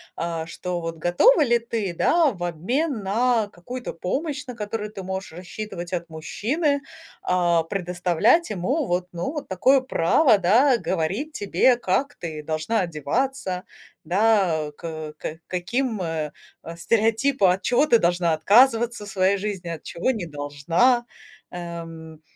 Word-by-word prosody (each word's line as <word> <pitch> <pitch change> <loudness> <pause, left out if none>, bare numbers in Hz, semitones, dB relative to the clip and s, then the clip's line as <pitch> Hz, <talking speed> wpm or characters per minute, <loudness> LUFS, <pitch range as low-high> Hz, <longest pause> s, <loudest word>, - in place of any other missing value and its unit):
а 165 -1 -3
что, 180 +1 -4
вот 165 0 -5
готова 235 - +4
ли 240 -2 +3
ты, 225 -6 -3
да, 320 - +3
в 175 -4 -7
обмен 225 - -1
на 225 +1 +1
какую-то 245 +9 -7
помощь, 290 - -3
на 250 - -7
которую 210 -1 -4
ты 195 -3 -8
можешь 190 -1 -5
рассчитывать 180 0 -7
от 170 -1 -3
мужчины, 275 - -1 0.4
а, 175 -2 +2
предоставлять 180 - +1
ему 245 - -1
вот, 180 -2 -1
ну, 175 +10 -3
вот 300 - -5
такое 255 +9 +4
право, 240 - +3
да, 235 +8 +4
говорить 190 - -2
тебе, 205 - +3
как 240 +5 -1
ты 160 -3 -6
должна 155 +8 -1
одеваться, 180 - -2 0.4
да, 185 -4 +2
э, - - -13
к - - -11
э, 155 -2 -6
к 160 +1 -6
каким, 215 +6 -2
э, 160 -3 -3 0.3
э, 165 - -8
стереотипа, 225 +1 +2
от 190 - -6
чего 250 +5 +3
ты 235 - +6
должна 175 -1 +2
отказываться 230 +6 +3
в 205 - -9
своей 195 +1 +2
жизни, 195 -3 -4
от 165 -2 -5
чего 175 +10 -1
не 215 -8 -4
должна. 160 - +1 0.5
Эм, 165 -2 -8
190 Hz, 150 wpm, -24 LUFS, 170-240 Hz, 0.5 s, ты